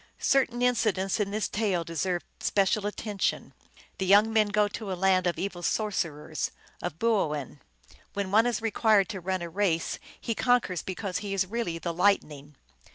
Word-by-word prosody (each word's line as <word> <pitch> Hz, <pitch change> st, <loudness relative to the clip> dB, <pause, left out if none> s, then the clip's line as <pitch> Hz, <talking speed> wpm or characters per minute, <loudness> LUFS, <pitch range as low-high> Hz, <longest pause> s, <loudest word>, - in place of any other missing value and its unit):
Certain 250 Hz, -3 st, +2 dB
incidents 215 Hz, -5 st, +1 dB
in 205 Hz, -2 st, 0 dB
this 210 Hz, +1 st, -1 dB
tale 200 Hz, -5 st, 0 dB
deserve 175 Hz, +2 st, -2 dB
special 200 Hz, +1 st, +1 dB
attention. 210 Hz, -1 st, -2 dB, 0.5 s
The 190 Hz, -, -1 dB
young 210 Hz, +3 st, +5 dB
men 215 Hz, -1 st, +4 dB
go 205 Hz, 0 st, +2 dB
to 205 Hz, -1 st, -6 dB
a -, -, -1 dB
land 185 Hz, -1 st, +3 dB
of 175 Hz, -, 0 dB
evil 190 Hz, -2 st, -4 dB
sorcerers, 165 Hz, -7 st, -1 dB, 0.3 s
of 155 Hz, -, -4 dB
boo 220 Hz, -7 st, +2 dB
oin. 140 Hz, -4 st, -7 dB, 0.5 s
When 200 Hz, -2 st, -3 dB
one 220 Hz, +3 st, +5 dB
is 235 Hz, -2 st, -1 dB
required 220 Hz, -2 st, +3 dB
to 200 Hz, -4 st, -4 dB
run 185 Hz, 0 st, -2 dB
a -, -, -4 dB
race 170 Hz, -2 st, 0 dB, 0.2 s
he 230 Hz, -, -2 dB
conquers 240 Hz, -7 st, +1 dB
because 190 Hz, 0 st, -4 dB
he 200 Hz, -2 st, -4 dB
is 190 Hz, -1 st, +2 dB
really 210 Hz, -4 st, -3 dB
the 170 Hz, 0 st, -3 dB
Lightning. 150 Hz, -6 st, +1 dB
195 Hz, 170 wpm, -28 LUFS, 175-215 Hz, 0.5 s, young